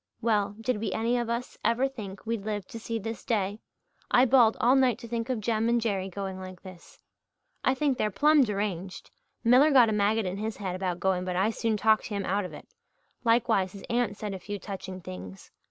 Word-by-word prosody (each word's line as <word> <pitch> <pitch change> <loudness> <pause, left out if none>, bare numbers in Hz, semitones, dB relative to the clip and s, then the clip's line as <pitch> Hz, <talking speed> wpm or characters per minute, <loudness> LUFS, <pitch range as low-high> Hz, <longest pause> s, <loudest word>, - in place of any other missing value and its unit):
"Well, 205 -3 +1
did 240 +1 -1
we 225 - -2
any 230 +2 0
of 235 -1 -3
us 235 +2 -4
ever 250 +4 +2
think 205 -7 -9
we'd 225 -2 -2
live 210 -2 -3
to 230 - -7
see 230 0 -3
this 225 +1 -5
day? 205 -2 -1 0.5
I 250 - +5
bawled 240 -3 +5
all 250 +3 +4
night 255 -4 +3
to 235 - -10
think 230 +1 -3
of 250 -3 0
Jem 220 +1 0
and 235 0 +3
Jerry 195 -4 -1
going 190 0 -5
like 185 -1 -9
this. 185 -3 -13 0.7
I 260 - +3
think 275 -1 0
they're 215 - +2
plumb 295 +8 +4
deranged. 195 -4 -3 0.3
Miller 250 +6 +6
got 255 -6 +6
a - - 0
maggot 210 +1 +2
in 185 +1 -3
his 215 +1 -4
head 190 -3 -3
about 185 -2 -2
going 190 -1 +1
but 180 -1 -3
I 195 +5 +2
soon 225 -1 -1
talked 220 +1 +3
him 200 -2 -3
out 200 +1 0
of - - -8
it - - -11 0.6
likewise 230 -6 +2
his 200 - -10
aunt 235 -4 0
said 210 -2 -4
a 190 - -5
few 205 +2 -5
touching 190 -1 -7
things. 95 - -9
215 Hz, 220 wpm, -28 LUFS, 195-235 Hz, 0.7 s, Miller